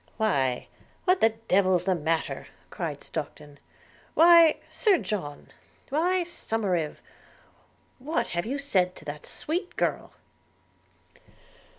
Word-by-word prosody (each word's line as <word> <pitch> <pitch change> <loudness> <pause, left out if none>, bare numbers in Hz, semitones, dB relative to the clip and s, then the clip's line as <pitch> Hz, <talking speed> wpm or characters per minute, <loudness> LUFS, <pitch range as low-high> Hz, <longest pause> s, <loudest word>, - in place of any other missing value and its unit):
– - - -34
'Why, 135 - 0 0.4
what 370 0 +3
the 225 - +6
devil's 190 -5 +1
the 190 0 +2
matter?' 165 -1 -2 0.2
cried - - -5
Stockton. 145 -1 -7 0.6
'Why, 335 -1 +7
Sir 415 -5 +2
John 175 - -5 0.2
– - - -32
why, 350 +6 +1
Somerive, 200 - -2 1.0
what 300 +6 -2
have 175 +4 -2
you 270 +4 -2
said 185 -10 +1
to - - -13
that 145 0 -7
sweet 350 +4 -3
girl?' - - -1
215 Hz, 115 wpm, -27 LUFS, -, 1.0 s, Why